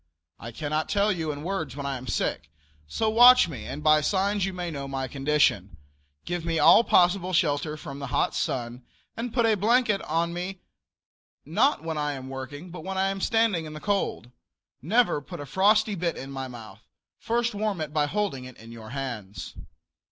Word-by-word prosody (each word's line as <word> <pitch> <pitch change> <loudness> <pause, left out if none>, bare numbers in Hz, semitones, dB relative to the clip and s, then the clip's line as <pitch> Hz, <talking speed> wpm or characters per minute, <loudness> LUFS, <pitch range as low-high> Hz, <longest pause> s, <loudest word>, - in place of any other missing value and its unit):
I 115 - -8
cannot 155 +5 -2
tell 205 +1 +2
you 165 -5 -2
in 145 0 -7
words 160 -8 -3
when 140 -1 -5
I 140 -1 -2
am 130 +1 -10
sick, 80 -7 -2 0.4
so 220 - -1
watch 245 -1 +8
me 155 -6 -7
and 150 - -6
by 155 0 +5
signs 195 +4 +1
you - - -3
may 180 -2 -4
know 140 -2 -5
my 135 -1 -3
condition. 135 - +1 0.5
Give 175 -1 -3
me 165 -1 -1
all 225 - +7
possible 180 -2 +3
shelter 150 -3 +1
from 140 -4 -8
the 140 - -5
hot 125 - 0
sun, 120 0 -3 0.3
and 235 +1 -4
put 235 -1 +2
a 225 - +4
blanket 215 0 +2
on 170 +2 -1
me 180 +2 -5 0.8
not 280 - +2
when 160 -2 -3
I 150 0 -1
am 130 -1 -8
working, 140 +6 -7
but 175 -2 -8
when 190 0 -4
I 190 +1 +2
am 195 0 -4
standing 225 -8 +1
in 155 - -8
the 155 - -7
cold. 195 - -2 0.5
Never 215 - +2
put 140 - -9
a 145 - -6
frosty 210 - +3
bit 175 -3 -2
in 135 +1 -7
my 135 -1 -5
mouth; 110 -4 -11 0.4
first 235 0 0
warm 205 -3 -2
it 155 -1 -4
by 150 -1 +2
holding 190 -8 -2
it 130 -1 -12
in 115 +1 -13
your 110 -2 -10
hands. 120 -7 -6
160 Hz, 195 wpm, -26 LUFS, 135-195 Hz, 0.8 s, watch